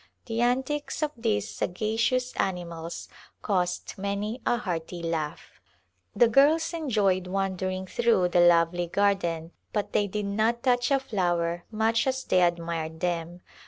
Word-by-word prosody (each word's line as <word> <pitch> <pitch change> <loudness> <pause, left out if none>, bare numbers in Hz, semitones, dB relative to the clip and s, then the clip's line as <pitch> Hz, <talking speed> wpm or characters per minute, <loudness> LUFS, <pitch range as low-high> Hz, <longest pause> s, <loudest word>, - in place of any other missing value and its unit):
The 230 0 -2
antics 265 +6 0
of 300 - 0
these 105 - 0
sagacious 225 - 0
animals 170 -3 -3 0.4
caused 180 -2 -1
many 200 +4 -3
a 240 - +3
hearty 175 -5 -4
laugh. 160 -3 -4 0.5
The 240 - +6
girls 305 +8 +4
enjoyed 210 - +1
wandering 190 0 -2
through 230 -4 +2
the 175 0 +4
lovely 175 0 +4
garden 175 -4 0 0.2
but 210 -2 -2
they 205 - +2
did 210 +1 -3
not 220 +4 0
touch 245 -1 +2
a 275 -1 +3
flower 175 -7 -1
much 225 +2 +1
as 265 0 -1
they 185 - +2
admired 170 -2 -1
them. 175 0 -2
195 Hz, 135 wpm, -27 LUFS, 175-235 Hz, 0.5 s, The